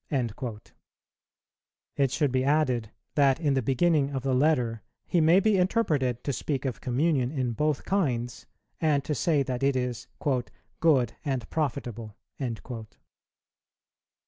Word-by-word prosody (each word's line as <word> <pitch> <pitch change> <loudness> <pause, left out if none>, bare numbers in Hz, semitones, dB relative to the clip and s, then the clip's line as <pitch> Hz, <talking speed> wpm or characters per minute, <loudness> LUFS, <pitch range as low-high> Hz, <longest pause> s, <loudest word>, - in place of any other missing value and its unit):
"[132:1] 120 -4 -3 1.2
It 140 -1 +2
should 135 +2 +1
be 130 0 +1
added, 130 -6 +1 0.2
that 140 -2 +3
in 150 -4 +1
the 135 - +2
beginning 140 +3 +2
of 135 -3 -4
the 135 -1 +1
Letter 125 -5 +2 0.2
he 175 - +2
may 165 +4 +6
be 200 -1 +3
interpreted 150 - +1
to 140 - -1
speak 140 +1 -2
of 130 - -3
communion 130 0 +1
in 130 -5 -1
both 150 +4 -1
kinds, 125 -11 -1 0.3
and 150 -4 +2
to 150 - -2
say 150 0 +2
that 130 -1 -3
it 140 0 +2
is 125 -2 -2 0.7
"good 135 -8 +3
and 130 -6 -2
profitable." 120 -8 -3
135 Hz, 135 wpm, -27 LUFS, 125-155 Hz, 1.2 s, may